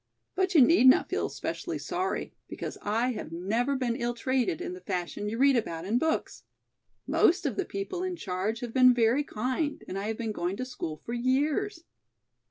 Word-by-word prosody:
But 375 -1 0
you 290 - +9
need 295 -1 +6
not 255 - +6
feel - - -1
specially - - -4
sorry, 370 +2 -3
because - - -6
I 230 +5 0
have 215 - -6
never 220 +11 0
been 250 -3 -1
ill 240 0 -2
treated 250 - 0
in - - -4
the 180 - -9
fashion 185 +2 -3
you 225 - -4
read 275 +1 +5
about 170 -8 -2
in 225 +5 +1
books. 320 +2 -1 0.6
Most 360 +1 +3
of 265 -7 0
the - - -1
people 200 - -4
in 370 -1 -2
charge 205 - -3
have 240 -2 -5
been 255 -1 +6
very 240 +4 +3
kind 260 +5 -2
and 190 - -4
I 200 - -3
have 220 0 -2
been 230 -2 -2
going 180 -1 -2
to 255 - -3
school 165 -11 -5
for 235 - -4
years. 295 +10 0
240 Hz, 195 wpm, -28 LUFS, 210-280 Hz, 0.6 s, you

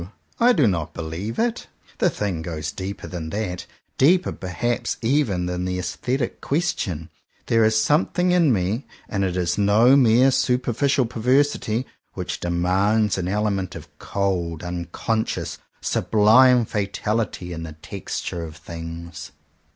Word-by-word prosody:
I 240 +1 +6
do 145 - +3
not 85 -5 -1
believe 85 +7 -5
it! 230 0 -1 0.3
The - - +4
thing 95 -6 -3
goes 80 -2 -4
deeper 95 +1 -6
than 85 -3 -6
that; 95 -2 -4 0.3
deeper 175 +7 +4
perhaps 115 +6 -2
even 115 -8 +1
than 90 0 -2
the 90 0 -2
aesthetic 120 +8 -2
question. 95 - -2 0.3
There 115 -1 +3
is 110 0 +3
some 150 +9 +3
thing 180 0 +1
in 170 -5 +4
me 105 +4 -1
— - - -27
and 100 -2 -1
it 90 -1 -1
is 90 +2 0
no 110 +6 +5
mere 130 0 +5
superficial 130 +2 +1
perversity 125 0 +1
— - - -50
which - - -4
demands 95 +4 +1
an 90 - -2
element 100 -2 -1
of - - -11
cold, 90 -5 -2
unconscious, 90 +6 -3 0.2
sublime 120 +3 +4
fatality 105 -3 -2
in 80 - -6
the 80 -1 -7
texture 80 +2 -5
of 80 -1 -8
things. 85 0 -8
100 Hz, 145 wpm, -23 LUFS, 90-120 Hz, 0.3 s, I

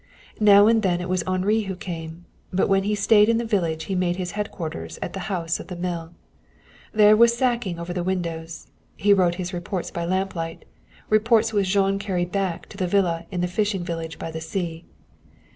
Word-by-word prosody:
Now 205 -1 +7
and 225 0 +4
then 180 -4 +1
it 180 - -4
was 185 -1 +1
Henri 190 +4 +1
who 190 - -3
came, 165 -1 -7 0.3
but 190 - +1
when 195 0 +2
he 210 +1 +1
stayed 210 +1 +5
in 230 - +3
the 235 - -1
village 170 -8 0
he 190 - -4
made 180 -1 +1
his 180 -1 -4
headquarters 180 -6 -5
at - - -5
the 195 - -4
house 170 -4 -1
of - - -9
the 180 - -6
mill. 170 -2 -4 0.8
There, 210 0 +6
with 235 +2 +6
sacking 235 -6 0
over 170 +1 -5
the 175 -1 -2
windows, 170 -3 -3 0.3
he 205 0 +4
wrote 180 -3 +3
his 180 +1 -5
reports 175 +1 -4
by 170 - -3
lamplight, 180 -2 -3 0.5
reports 220 +1 +3
which 200 -3 +1
Jean 195 0 +2
carried 180 -3 -2
back 190 -3 -2
to - - -12
the 185 -2 -1
villa 175 -3 +1
in 180 -3 -3
the 180 - +1
fishing 200 0 -1
village 165 -1 -5
by 165 - -6
the 160 0 -6
sea. 170 -2 -4
185 Hz, 200 wpm, -24 LUFS, 170-205 Hz, 0.8 s, Now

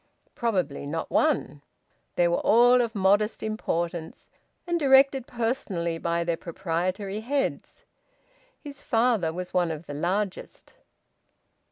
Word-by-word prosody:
Probably 180 - -2
not 160 +2 -4
one. 205 - +1 0.5
They 175 - +3
were 170 - +1
all 245 +3 +5
of 230 -1 -3
modest 205 +2 +2
importance, 170 -6 -3 0.4
and 345 -1 0
directed 270 -2 +4
personally 210 -9 -2
by 170 0 -1
their 170 -1 -1
proprietary 185 +4 -3
heads. 280 - -3 0.8
His 285 -2 -9
father's 225 -9 +1
was 180 0 -6
one 175 -2 +2
of 160 0 -6
the 145 - -7
largest... 185 +6 -3
195 Hz, 120 wpm, -26 LUFS, 170-240 Hz, 0.8 s, all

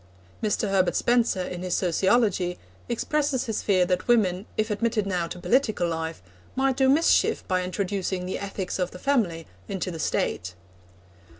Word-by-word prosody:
Mr. 210 -1 0
Herbert 185 -2 +2
Spencer, 235 -6 +2
in 180 -1 -5
his 180 -1 -1
Sociology, 185 0 +2 0.3
expresses 275 +2 0
his 220 -3 -2
fear 185 -3 +3
that 180 0 -1
women, 200 -5 +2
if 215 0 0
admitted 220 0 0
now 180 -3 -1
to 180 - -7
political 215 -3 +1
life, 160 - -4 0.3
might 265 0 +2
do 265 -1 +4
mischief 310 +5 +3
by 185 -1 +1
introducing 185 0 -2
the 185 - -3
ethics 195 -1 -4
of 180 -1 0
the - - -10
family 180 - 0 0.2
into 190 -1 -3
the 165 - -7
State. 90 - -1
195 Hz, 160 wpm, -26 LUFS, 180-230 Hz, 0.3 s, do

